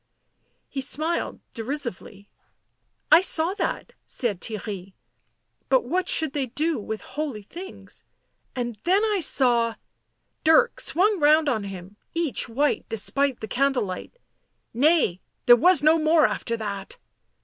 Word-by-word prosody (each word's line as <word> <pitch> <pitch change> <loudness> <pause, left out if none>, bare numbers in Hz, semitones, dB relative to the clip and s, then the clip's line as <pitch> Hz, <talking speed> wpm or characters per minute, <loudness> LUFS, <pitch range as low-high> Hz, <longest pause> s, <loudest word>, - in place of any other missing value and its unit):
He 275 - -5
smiled 310 +5 -1
derisively. 230 -5 -5 0.4
" - - -47
I 320 +3 +8
saw 340 -1 +1
that," 415 - -4
said 210 -8 -1
Theirry. 200 -3 -6 0.4
" 115 0 -49
But 260 -1 +3
what 360 +9 -1
should 315 -4 +3
they 275 -3 -2
do 305 +5 -1
with 215 +1 -5
holy 285 -9 -5
things? 360 - -10 0.3
— - - -47
and 240 -4 -4
then 385 +4 +3
I 420 -2 0
saw 240 -7 +2 0.3
" - - -50
Dirk 320 +11 +4
swung 410 -2 +2
round 305 +1 +4
on 220 -7 0
him; 195 +1 -9 0.2
each 330 -9 0
white 285 +6 0
despite 265 +4 0
the 220 - -5
candle 270 +1 +1
light. 185 - -8 0.3
" - - -49
Nay 300 - +3
— - - -50
there 240 - +9
was 325 +4 +4
no 315 +2 +5
more 310 0 +4
after 230 -1 -2
that!" 200 -3 -6
270 Hz, 150 wpm, -24 LUFS, 220-320 Hz, 0.4 s, there